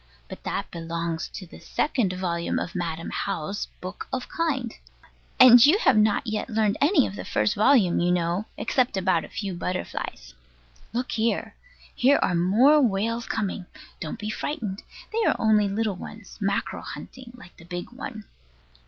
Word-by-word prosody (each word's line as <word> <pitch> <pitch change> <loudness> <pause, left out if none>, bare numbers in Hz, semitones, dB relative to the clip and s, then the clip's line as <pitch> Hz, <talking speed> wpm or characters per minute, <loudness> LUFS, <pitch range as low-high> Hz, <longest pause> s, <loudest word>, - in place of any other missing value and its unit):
But - - -9
that - - -4
belongs 165 0 -3
to 195 - -9
the 170 - -13
second 245 -11 0
volume 170 -2 -2
of 175 - -3
Madam 165 -3 -3
How's 195 +1 -3
Book 185 +2 -7
of 255 -1 -3
Kind; 270 -9 -1 0.7
and 245 -2 +10
you 300 +8 +6
have 270 - +4
not 215 +4 +3
yet 215 +2 -3
learned 215 -2 +1
any 290 -1 +4
of 195 - -5
the - - -6
first 210 - +1
volume, 215 -4 +4
you 175 +1 +2
know, 175 +3 0
except 250 -6 0
about 185 -3 +2
a - - -14
few 200 -3 -4
butterflies. 175 - -5 0.6
Look 250 +5 -3
here! 230 -3 0 0.4
Here 270 +3 +4
are 180 - +1
more 225 - +5
whales 230 0 0
coming. 195 -4 -3 0.3
Don't 160 - -5
be 210 0 -4
frightened. 215 -8 -4 0.3
They 455 +1 +1
are - - +2
only 215 -2 +3
little 205 -1 -1
ones, 215 +2 -10
mackerel 200 0 -1
hunting, 255 -2 -9
like 180 -8 -15
the - - -14
big 175 +3 -6
one. 235 -4 -7
210 Hz, 165 wpm, -25 LUFS, 180-245 Hz, 0.7 s, and